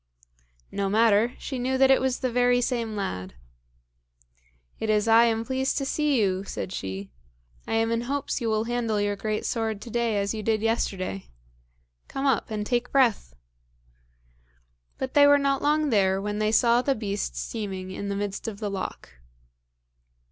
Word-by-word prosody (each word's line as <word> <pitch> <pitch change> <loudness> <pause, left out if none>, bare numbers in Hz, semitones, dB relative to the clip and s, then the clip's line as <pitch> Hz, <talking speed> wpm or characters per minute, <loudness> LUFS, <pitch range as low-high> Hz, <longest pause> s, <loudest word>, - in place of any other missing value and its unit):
No 200 -1 -1
matter; 225 +2 +3
she 265 -3 -5
knew 260 +2 0
that 270 0 +5
it 265 - +4
was 260 -1 -1
the 255 -2 0
very 245 0 +3
same 235 -3 -1
lad. 95 - -4 1.4
"It 220 - -2
is 210 0 +2
I 225 +1 +6
am 225 -1 0
pleased 265 +1 -1
to 275 - -1
see 295 -1 +1
you," 190 -2 +1
said 190 -1 -5
she. 95 - -5 0.6
"I - - -3
am 225 0 +1
in 230 0 0
hopes 275 +2 -2
you 230 - 0
will 215 0 +1
handle 230 -2 -1
your 205 0 0
great 215 +1 -3
sword 225 -3 -1
to 235 - -9
day 235 -2 0
as 200 +1 0
you 220 - -4
did 215 0 0
yesterday. 190 - -1 0.8
Come 270 +1 -4
up 265 -6 +1
and 210 -1 -3
take 245 +2 -1
breath." 235 - +2 1.6
But 260 -1 -4
they 285 -1 +7
were 285 0 +7
not 275 -1 +1
long 300 0 +2
there 190 -3 +3
when 205 +1 -3
they 215 0 +1
saw 235 +2 +4
the 275 +1 +1
beast 205 -3 -3
steaming 190 -4 -5
in 200 +1 -5
the 200 - -2
midst 200 +2 -4
of 215 -3 -5
the 210 -2 -3
loch. 195 -1 -5
225 Hz, 175 wpm, -26 LUFS, 205-250 Hz, 1.6 s, they